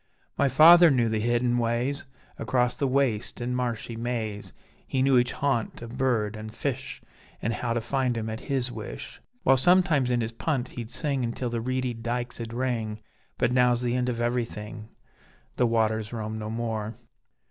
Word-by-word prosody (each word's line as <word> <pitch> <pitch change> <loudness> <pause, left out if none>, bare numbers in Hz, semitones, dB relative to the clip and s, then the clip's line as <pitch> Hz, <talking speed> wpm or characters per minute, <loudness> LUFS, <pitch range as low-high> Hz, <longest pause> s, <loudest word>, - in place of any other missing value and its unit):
My 140 - +2
feyther 170 +4 +8
knew 120 -5 +2
the 110 0 0
hidden 120 +2 +1
ways, 120 +4 -1 0.3
Across 125 -1 +1
the 140 - +1
waste 130 -5 0
and 125 +1 -2
marshy 120 -2 -2
maze, 115 -3 -3 0.4
He 130 -1 +1
knew 135 -1 +4
each 120 0 +1
haunt 135 -5 -1
of 115 +1 -8
bird 120 -5 +1
an' 110 0 -7
fish, 130 +3 -4 0.4
An' 115 - -1
how 120 0 -2
to 120 - -1
find 125 0 0
'em 110 -1 -3
at 110 0 -4
his 130 -3 0
wish; 105 - -8 0.2
While 135 +1 +5
sometimes 170 -4 +4
in 120 -1 +1
his 115 0 -2
punt 130 +1 -2
he'd 115 -2 -7
sing 140 0 -1
Until 120 +1 -2
the 115 -1 -2
reedy 130 +1 -1
dykes'd 120 0 -4
ring, 115 -3 -2 0.4
But - - +2
now's 125 -1 +3
the 120 0 0
end 125 0 0
of 120 -2 -2
everything: 115 -2 -3 0.7
The 125 - +3
waters 110 -1 +1
roam 110 -1 -4
no 110 0 -4
more. 110 -1 -3
120 Hz, 175 wpm, -27 LUFS, 115-130 Hz, 0.7 s, feyther